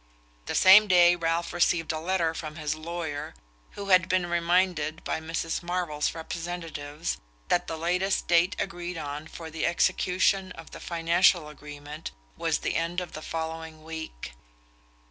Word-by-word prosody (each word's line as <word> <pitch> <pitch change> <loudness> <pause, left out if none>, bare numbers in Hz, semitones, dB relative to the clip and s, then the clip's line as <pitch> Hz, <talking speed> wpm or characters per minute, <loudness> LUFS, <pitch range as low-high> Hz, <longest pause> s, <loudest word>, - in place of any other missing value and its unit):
The - - -2
same 210 +3 +8
day 175 -2 +6
Ralph 170 0 -1
received 170 -1 +2
a 155 - -3
letter 170 -1 0
from 155 -2 -6
his 150 -1 -2
lawyer, 155 - -5 0.4
who 200 0 -6
had 185 -1 +5
been 185 -1 +2
reminded 170 -2 +1
by - - -2
Mrs. 165 0 -3
Marvell's 175 -4 -1
representatives 165 -2 -5 0.3
that - - +2
the 160 - -4
latest 180 +4 0
date 175 +2 +4
agreed 175 -2 -4
on 150 0 -5
for 160 0 -9
the 160 +1 -1
execution 185 +2 +2
of - - -12
the - - -9
financial 170 -1 +3
agreement 150 +1 -8 0.3
was - - 0
the - - -2
end 170 +2 -1
of 180 -2 -6
the 155 - -6
following 160 -1 -5
week. 160 - -7
165 Hz, 150 wpm, -27 LUFS, 160-175 Hz, 0.4 s, same